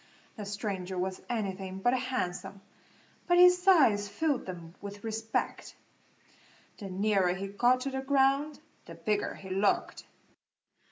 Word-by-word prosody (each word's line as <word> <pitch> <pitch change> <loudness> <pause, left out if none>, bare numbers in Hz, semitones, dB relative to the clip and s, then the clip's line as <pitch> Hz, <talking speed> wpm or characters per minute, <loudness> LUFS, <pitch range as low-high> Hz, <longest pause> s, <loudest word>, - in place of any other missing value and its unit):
The 210 - -7
stranger 195 -3 -4
was 185 +1 -3
anything 195 -5 -3
but 245 +6 +2
handsome, 255 -7 -3 0.7
but 350 -1 +4
his 360 0 +7
size 270 - +5
filled 300 -1 -1
them 170 -2 -8
with 205 0 -8
respect. 225 0 -3 1.0
The 200 -3 -7
nearer 190 -1 +1
he 195 +1 -5
got 245 +5 +2
to 275 +1 -3
the 265 0 -3
ground 275 +2 +2 0.3
the 165 - -10
bigger 205 +5 -1
he 190 -1 -10
looked. 195 +2 0
205 Hz, 130 wpm, -30 LUFS, 190-265 Hz, 1.0 s, his